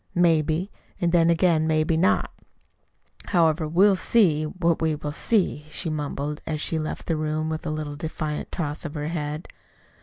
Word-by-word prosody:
"Maybe 165 +1 +2 0.3
an' 170 -1 +1
then 170 -1 +4
again 165 -2 +3
maybe 155 +1 +2
not. 185 +6 +2 0.9
However, 165 -3 +2
we'll 190 +5 +4
see 180 -6 +3
what 170 0 0
we 160 -1 +1
will 150 0 -5
see," 175 -4 0
she 160 +1 -3
mumbled, 150 0 -3
as 155 -1 -2
she 160 +1 -1
left 155 - -4
the 165 - 0
room 155 0 -1
with 160 0 -4
a - - 0
little 155 -1 -4
defiant 155 0 -4
toss 150 -4 -3
of 155 -1 -6
her 150 0 -3
head. 150 -1 -4
160 Hz, 170 wpm, -25 LUFS, 150-170 Hz, 0.9 s, then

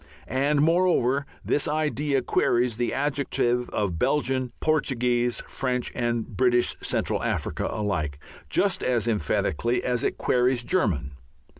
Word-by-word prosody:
And, 140 +2 +1
moreover, 155 -5 +2 0.2
this 145 - +1
idea 150 -3 0
queries 120 -2 +1
the 120 0 0
adjective 135 -3 0
of 90 -6 -2
Belgian, 130 -2 0
Portuguese, 125 -5 +1
French, 125 -2 -2
and 120 -2 -1
British 120 +2 +1
Central - - -1
Africa - - -2
alike, 85 -9 -2 0.3
just 195 - +1
as 120 -3 0
emphatically 115 +3 0
as 125 -1 0
it - - -1
queries 125 0 +2
"German." 80 - 0
125 Hz, 120 wpm, -25 LUFS, 120-140 Hz, 0.3 s, moreover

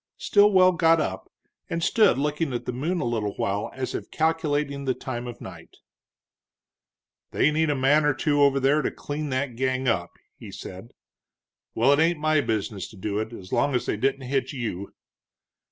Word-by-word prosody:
Stilwell 200 -3 +5
got 165 -2 +3
up, 95 -10 -4 0.4
and 165 0 -2
stood 215 - +4
looking 150 0 -1
at 120 - -4
the - - -3
moon 165 +8 -2
a - - -2
little 110 -4 -2
while 100 +1 -2
as 130 -1 -5
if - - -5
calculating 150 -3 -1
the 130 -1 0
time 125 -2 -5
of 120 - -8
night. - - -11 1.5
"They 155 - +2
need 160 0 +1
a 145 - +1
man 140 +3 +3
or 145 -2 +2
two 145 +1 +1
over 140 -1 +4
there 140 +3 +3
to - - -1
clean 150 +1 -5
that 130 -1 -2
gang 130 +1 -1
up," 85 -7 0 0.3
he - - -11
said. 95 +5 -10 0.8
"Well, 130 +5 +4
it 145 - +2
ain't 165 +1 +3
my 155 0 +2
business 105 -5 -3
to - - -14
do 100 +2 -3
it, 110 +1 -4
as 95 -5 -10
long 140 -2 +1
as 125 - 0
they - - -1
didn't 135 +5 0
hit 135 +1 -2
you." 110 -7 -5
135 Hz, 185 wpm, -25 LUFS, 120-155 Hz, 1.5 s, Stilwell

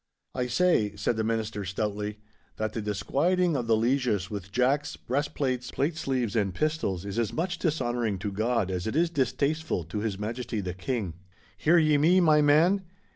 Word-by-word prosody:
'I 125 -1 -1
say,' 120 - +2
said - - 0
the 110 - -1
Minister, 110 -2 -2
stoutly, 105 +2 -3 0.4
'that 110 0 -3
the 115 - -3
disquieting 165 - +1
of 120 -4 -2
the 115 -1 +4
lieges 115 -5 +1
with 100 -2 -6
jacks, 130 +6 +1
breast 145 +4 -2
plates, 130 -3 -1
plate 155 +4 -1
sleeves, 130 -8 -1
and 100 -5 0
pistols 150 - -1
is 100 +3 -3
as 115 -3 0
much 175 +1 -2
dishonouring 120 - 0
to 100 +2 -4
God 110 -1 0
as 90 +1 -2
it 110 - -2
is 170 +1 +2
distasteful 145 - 0
to 85 +7 -5
His 105 -2 -2
Majesty 115 +2 -3
the 90 -3 -3
King—' 95 -2 -3 0.4
'Hear 165 +3 +3
ye 155 -3 +4
me, 175 +5 +5
my 155 -4 +5
man. 160 +7 +4
120 Hz, 180 wpm, -27 LUFS, 105-150 Hz, 0.4 s, me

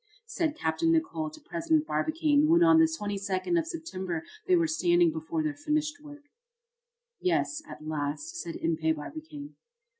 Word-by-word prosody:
said 335 -9 -2
Capt. 160 -1 -2
Nicholl 330 -1 +1
to 310 +1 -13
President 325 -1 0
Barbicane, 310 -2 +2
when 340 +2 +5
on 330 -1 +6
the 325 - +7
22d 205 - -1
of 325 - -3
September 190 - -4 0.2
they 370 - +5
were 335 -1 +3
standing 345 +2 +3
before 320 0 -3
their 305 -1 -1
finished 300 0 -1
work. 290 -1 -12 1.0
"Yes, 315 -4 0
at 155 - -10
last," 150 0 -3
said 170 -1 -6
Impey 160 -1 0
Barbicane. 290 - -8
305 Hz, 150 wpm, -29 LUFS, 200-325 Hz, 1.0 s, the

